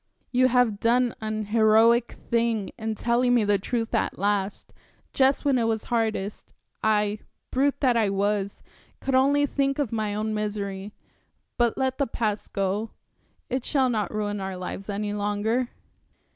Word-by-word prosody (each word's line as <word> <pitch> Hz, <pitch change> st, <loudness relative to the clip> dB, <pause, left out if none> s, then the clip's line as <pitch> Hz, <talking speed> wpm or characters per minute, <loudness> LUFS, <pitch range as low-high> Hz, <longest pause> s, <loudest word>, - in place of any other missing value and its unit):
You 255 Hz, 0 st, +4 dB
had 245 Hz, -5 st, +2 dB
done 240 Hz, +1 st, +2 dB
an 215 Hz, 0 st, -3 dB
heroic 225 Hz, +2 st, +4 dB, 0.2 s
thing 230 Hz, -3 st, +1 dB
in 220 Hz, -1 st, -3 dB
telling 245 Hz, +2 st, +2 dB
me 235 Hz, -, +3 dB
the 205 Hz, -1 st, +2 dB
truth 225 Hz, +3 st, -2 dB
at -, -, 0 dB
last, 200 Hz, 0 st, -1 dB, 0.4 s
just 270 Hz, +2 st, +3 dB
when 270 Hz, -3 st, +3 dB
it 230 Hz, -, +1 dB
was 225 Hz, -1 st, 0 dB
hardest 220 Hz, -3 st, -2 dB, 0.3 s
I 210 Hz, -1 st, +2 dB, 0.3 s
brute 275 Hz, +2 st, +1 dB
that 255 Hz, -4 st, +3 dB
I 220 Hz, -3 st, +2 dB
was 200 Hz, 0 st, -1 dB, 0.4 s
could 270 Hz, -, -2 dB
only 280 Hz, +2 st, +4 dB
think 275 Hz, -1 st, 0 dB
of 285 Hz, -7 st, -1 dB
my 215 Hz, -2 st, -1 dB
own 215 Hz, +1 st, -2 dB
misery. 205 Hz, -2 st, -3 dB, 0.6 s
But 240 Hz, -2 st, +1 dB
let 260 Hz, 0 st, -1 dB
the 280 Hz, -, +2 dB
past 215 Hz, -3 st, -2 dB
go 200 Hz, +3 st, -1 dB, 0.6 s
it 255 Hz, 0 st, -2 dB
shall 265 Hz, -3 st, +2 dB
not 215 Hz, -3 st, -1 dB
ruin 205 Hz, -1 st, -2 dB
our 190 Hz, -1 st, -4 dB
lives 195 Hz, +2 st, -6 dB
any 205 Hz, 0 st, -2 dB
longer." 210 Hz, +4 st, 0 dB
220 Hz, 160 wpm, -26 LUFS, 205-245 Hz, 0.6 s, You